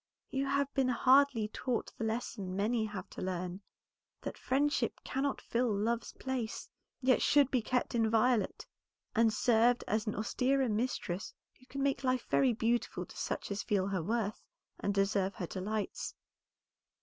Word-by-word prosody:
You 270 +1 0
have 280 0 0
been 270 -2 +2
hardly 255 -2 +4
taught 245 +1 -2
the - - -5
lesson 220 -4 -3
many 220 +3 +1
have 205 -4 -6
to - - -7
learn, 185 0 -3 0.6
that - - -5
friendship 290 +3 0
cannot 275 +1 -1
fill 240 0 0
love's 225 +3 -1
place, 255 -4 -4 0.4
yet 255 -1 +4
should 285 -2 +4
be 255 - +2
kept 250 +3 -1
inviolate, 225 0 +2 0.5
and 225 0 +5
served 235 +2 +3
as 215 0 0
an 210 - -1
austerer 255 +4 +1
mistress 210 -4 -2 0.2
who 255 - -21
can 275 -1 -3
make 275 0 0
life 255 -2 +1
very 265 -2 +4
beautiful 230 +1 0
to - - -14
such - - -3
as 200 +1 -1
feel 195 -3 +1
her 190 -3 -1
worth 215 +3 -1 0.4
and 200 0 -1
deserve 195 -1 +1
her 180 - -3
delights. 200 +4 -3
230 Hz, 155 wpm, -33 LUFS, 205-255 Hz, 0.6 s, and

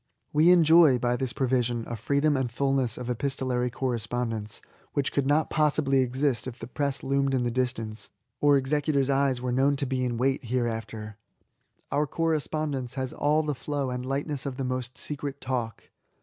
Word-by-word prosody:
We 155 +3 +5
enjoy, 165 -5 +7
by 120 0 0
this 125 0 -2
provision, 125 -3 0
a 120 - -4
freedom 140 +7 +1
and 130 -3 -1
fulness 135 -2 0
of 125 - -6
epistolary 125 0 -1
correspondence 115 -3 -3 0.3
which 140 -1 0
could 140 -1 +1
not 150 +2 +2
possibly 150 -3 +2
exist 130 -1 0
if 125 -1 -6
the - - -7
press 140 +2 -2
loomed 135 0 +1
in 125 - +1
the 120 - 0
distance, 115 -3 -3 0.3
or 145 -1 +5
executors* 140 0 +1
eyes 135 -2 +1
were 125 - -1
known 135 +3 +3
to 140 - -1
be 130 -1 -1
in 120 -2 -1
wait 135 +2 0
hereafter. 110 -3 -3 0.7
Our 145 +1 +1
correspondence 155 -5 -1
has 130 -1 -3
all 150 +2 +2
the 150 -1 -1
flow 140 0 -3
and 125 0 -3
lightness 140 +1 -2
of 130 -2 -5
the 135 - -2
most 130 0 -3
secret 140 -1 -4
talk. 120 -3 -4
130 Hz, 175 wpm, -27 LUFS, 125-140 Hz, 0.7 s, enjoy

